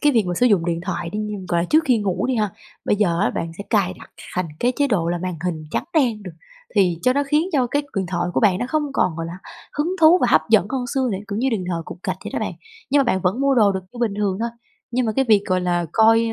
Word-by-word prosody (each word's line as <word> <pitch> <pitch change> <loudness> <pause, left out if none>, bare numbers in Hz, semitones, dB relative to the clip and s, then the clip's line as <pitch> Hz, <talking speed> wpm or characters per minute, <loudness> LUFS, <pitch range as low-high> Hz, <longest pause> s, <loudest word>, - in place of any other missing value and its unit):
cái 295 -1 +4
việc 225 -3 +4
mà 175 - -1
sử 250 - +3
dụng 195 -7 +3
điện 170 -1 -1
thoại 175 -3 -3
đi 210 - -4
như, 210 0 -3
gọi 170 -1 +1
là, - - -1
trước 315 +1 +4
khi 250 -4 +3
ngủ 195 0 -1
đi 260 - 0
ha, 210 -2 0 0.3
bây 205 - +2
giờ 175 -4 +1
á - - +2
bạn 165 0 -4
sẽ 200 - -6
cài 195 -5 +2
đặt - - -14 0.2
thành 180 -1 -1
cái 245 +1 +2
chế 285 -1 +2
độ 180 -9 0
là 175 0 -1
màn 180 0 -3
hình 160 -3 -2
trắng - - -1
đen 235 -9 +2
được, 180 -3 -8 0.4
thì 180 -5 +3
cho 255 - +4
nó 285 +1 +1
khiến 305 +5 +2
cho 260 -4 +2
cái 285 +4 0
điện 190 -2 0
thoại 175 -1 -1
của - - +2
bạn 200 -4 +3
nó 245 - -2
không 310 +1 +1
còn, 180 -11 +1
gọi 165 0 -4
là, 175 +2 -7 0.4
hứng 330 +5 +1
thú 330 +3 +7
và - - +3
hấp 155 - +6
dẫn 205 -4 +5
hơn 260 -2 -2
xưa 260 -2 +1
để, 190 - -2
kiểu 200 - -3
như, 265 +3 +1
đừng 205 -6 -1
thờ 165 -1 -2
cục - - -9
gạch - - -2
vậy - - -5
đó - - -1
bạn. - - -3 0.4
Nhưng 285 +1 +4
mà 275 - +3
bạn 190 -5 +1
vẫn 190 +8 0
mua 275 -1 +3
đồ 210 -4 +4
được 190 - -2
như 245 - -11
bình 225 -4 0
thường 200 -2 0
thôi, 235 +1 -1 0.4
nhưng 245 0 0
mà 220 - 0
cái 270 - +3
việc, 210 -2 +5
gọi 185 -1 +1
là, 175 -1 0
coi 225 +1 +5
210 Hz, 305 wpm, -21 LUFS, 180-255 Hz, 0.4 s, thú